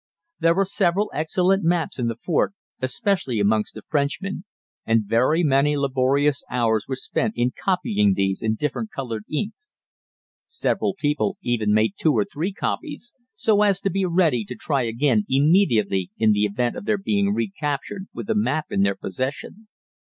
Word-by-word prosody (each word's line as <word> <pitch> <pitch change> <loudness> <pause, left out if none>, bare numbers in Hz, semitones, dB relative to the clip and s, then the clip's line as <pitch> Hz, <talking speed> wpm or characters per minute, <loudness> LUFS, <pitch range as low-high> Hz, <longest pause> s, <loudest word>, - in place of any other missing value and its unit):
There 165 0 +3
were 195 +1 +2
several 195 +1 +1
excellent 180 +5 +1
maps 165 -4 0
in 120 - 0
the 115 - -2
fort, 170 - 0 0.3
especially 130 - 0
amongst 105 +1 +1
the - - -9
Frenchmen, 150 +7 -2 0.4
and 115 -1 +2
very 125 - +2
many 145 0 +3
laborious 140 +1 +1
hours 115 -3 +1
were 130 - -2
spent 215 +10 -2
in 120 +1 +1
copying 105 - +1
these 95 0 0
in 110 0 0
different 150 - -3
colored 115 - -5
inks. 220 - -5 0.6
Several 195 - -1
people 155 +5 0
even 110 -4 0
made 110 -1 +3
two 155 - +3
or 105 -3 +2
three 170 +7 -3
copies, 245 - -4 0.2
so 210 -2 +2
as 200 -2 +3
to 195 - 0
be 195 0 0
ready 165 -9 +2
to 125 - -7
try 140 +4 -1
again 115 -1 +1
immediately 135 - +3
in 110 -1 +4
the 105 0 +2
event 120 +4 -1
of - - -7
their 215 -1 +1
being 200 0 0
recaptured 190 -2 -3
with - - -7
a 225 - 0
map 155 -7 0
in 95 - +1
their 100 0 +2
possession. 130 - -5
145 Hz, 165 wpm, -23 LUFS, 115-190 Hz, 0.6 s, in